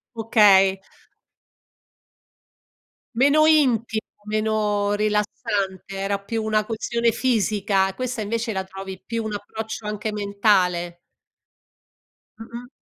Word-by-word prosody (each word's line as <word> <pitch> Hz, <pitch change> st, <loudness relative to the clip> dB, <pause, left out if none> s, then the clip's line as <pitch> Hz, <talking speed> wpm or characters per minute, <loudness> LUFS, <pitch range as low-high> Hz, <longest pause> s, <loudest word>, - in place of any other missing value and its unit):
Okay. 200 Hz, -4 st, +4 dB, 2.4 s
Meno 285 Hz, +5 st, +4 dB
intimo, 240 Hz, -8 st, +2 dB, 0.2 s
meno 210 Hz, -1 st, 0 dB
rilassante, 205 Hz, -2 st, -2 dB
era 200 Hz, +1 st, -1 dB
più 220 Hz, +3 st, -4 dB
una 215 Hz, -1 st, +1 dB
questione 230 Hz, +1 st, -1 dB
fisica, 205 Hz, -5 st, +1 dB
questa 250 Hz, +1 st, -4 dB
invece 225 Hz, +1 st, -2 dB
la 190 Hz, 0 st, -2 dB
trovi 190 Hz, 0 st, -9 dB
più 230 Hz, -1 st, -3 dB
un 215 Hz, -, -4 dB
approccio 215 Hz, +1 st, -6 dB
anche 210 Hz, 0 st, -3 dB
mentale. 195 Hz, -4 st, +1 dB, 1.4 s
Mh-mh. 235 Hz, +2 st, -9 dB
210 Hz, 95 wpm, -23 LUFS, 200-225 Hz, 2.4 s, Okay